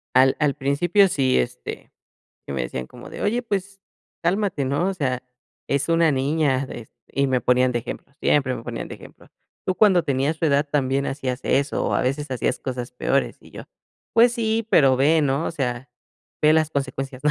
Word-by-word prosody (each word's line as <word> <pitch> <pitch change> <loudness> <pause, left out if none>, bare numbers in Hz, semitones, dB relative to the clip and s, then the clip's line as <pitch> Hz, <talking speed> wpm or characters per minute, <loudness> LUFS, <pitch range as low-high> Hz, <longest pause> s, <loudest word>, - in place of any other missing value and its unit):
Al 130 +1 +5
al 150 -2 +2
principio 165 +8 +3
sí, 135 -7 +1
este, 60 0 -5 0.6
sí - - -5
me 65 -2 -2
decían 65 +1 -4
como - - -12
de: - - -7
"Oye, 235 +4 0
pues, 200 -3 -4 0.4
cálmate", 180 -4 0
¿no? 140 +8 0
O 195 - -2
sea, 130 -7 -2 0.5
"es 140 +2 0
una 165 -1 +4
niña", 140 -1 +1
de 120 -3 -9 0.2
y 140 0 +1
me 130 -1 +1
ponían 125 +1 +3
de 120 - 0
ejemplo, 125 +3 -8
siempre 135 -3 +2
me 115 - -8
ponían 120 -1 -5
de - - -8
ejemplo: - - -16 0.4
"Tú 185 - -1
cuando 190 -5 +5
tenías 140 +3 0
su 165 - -2
edad 145 -1 +2
también 140 -1 0
hacías 135 -2 -3
eso, 140 +1 +1
o, - - 0
a - - +1
veces 140 +3 -1
hacías 125 0 -1
cosas 125 -2 -5
peores". 125 - 0
Y - - -18
yo: - - -8 0.5
"Pues 235 +1 +6
sí, 225 -1 -1
pero 135 - +5
ve, 155 +4 +4
¿no? 140 +3 0
O - - -1
sea, 125 -3 -3 0.5
ve 155 0 +6
las 155 -1 +2
consecuencias", 135 -2 -4
¿no? 150 - +4
140 Hz, 200 wpm, -23 LUFS, 130-165 Hz, 0.6 s, Pues